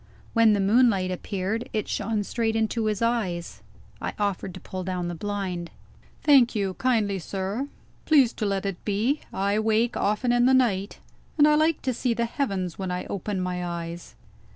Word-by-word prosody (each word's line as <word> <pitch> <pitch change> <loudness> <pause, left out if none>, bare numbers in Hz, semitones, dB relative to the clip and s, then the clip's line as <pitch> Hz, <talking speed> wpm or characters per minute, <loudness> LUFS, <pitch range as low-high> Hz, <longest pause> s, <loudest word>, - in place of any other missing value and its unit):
When 230 -2 +5
the 205 - +1
moonlight 200 -2 +3
appeared, 195 +5 -3
it 215 - -1
shone 220 -2 -1
straight 225 +1 -1
into 225 0 0
his 215 +1 0
eyes. 200 -8 -1 0.4
I - - -3
offered 200 -2 -1
to - - -8
pull 185 -1 -6
down 180 -1 -2
the - - -3
blind. 185 -2 -3 0.5
"Thank 270 -6 +5
you 195 -3 0
kindly, 215 -6 +1
sir; 195 +9 -3 0.4
please 275 -7 +5
to 215 - -2
let 195 0 -1
it 195 -3 -4
be. 220 +8 0
I 200 +2 0
wake 220 +2 +1
often 210 +4 +1
in 240 0 +4
the 260 - +5
night, 205 -6 +1 0.4
and 295 -1 +7
I 300 - +5
like 310 +1 +2
to 260 - 0
see 240 0 0
the 235 0 0
heavens 200 - -2
when 190 -1 -3
I 180 0 -3
open 200 0 -3
my 180 -1 -2
eyes." 170 0 -6
210 Hz, 180 wpm, -26 LUFS, 190-235 Hz, 0.5 s, and